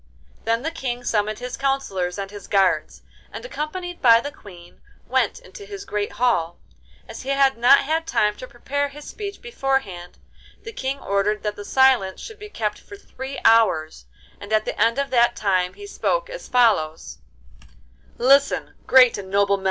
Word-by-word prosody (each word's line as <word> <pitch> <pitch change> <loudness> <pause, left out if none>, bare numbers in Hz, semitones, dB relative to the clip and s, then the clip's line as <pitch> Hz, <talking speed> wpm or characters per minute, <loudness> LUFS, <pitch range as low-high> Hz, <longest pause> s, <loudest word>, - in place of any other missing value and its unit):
Then 230 +2 0
the 320 - -2
King 245 -6 -4
summoned 215 -2 0
his 250 +1 -6
counsellors 270 -11 -2
and 195 0 -5
his 205 -2 -10
guards, 195 -2 +1 0.3
and, - - -8
accompanied 355 -3 -5
by 230 -3 +7
the 285 +4 -5
Queen, 175 -8 -15 0.3
went 250 -3 +1
into 185 +2 -12
his 200 -1 -9
great 210 0 -3
hall. 175 -9 0 0.5
As - - -8
he 265 - -7
had 275 -1 +3
not 245 +4 +6
had 320 +3 -1
time 210 0 +1
to 255 - -8
prepare 285 +4 -3
his 295 +1 -12
speech 405 +1 -7
beforehand, 270 - -3 0.5
the 450 - -7
King 270 -6 -3
ordered 200 0 -1
that 210 -1 -4
silence 260 -8 +3
should 440 -1 -10
be 420 0 -9
kept 215 - -3
for 405 - -12
three 270 -7 -8
hours, 160 - +3 0.3
and 205 - -10
at 215 0 +2
the - - -4
end 230 +3 +3
of 280 0 -2
that 240 -1 +3
time 185 -3 0
he 410 - -10
spoke - - -2
as - - -8
follows: 160 - +1 1.0
'Listen, 275 +3 +3
great 255 -4 +6
and 190 -1 -9
small! 200 0 +2
240 Hz, 170 wpm, -22 LUFS, 200-275 Hz, 1.0 s, by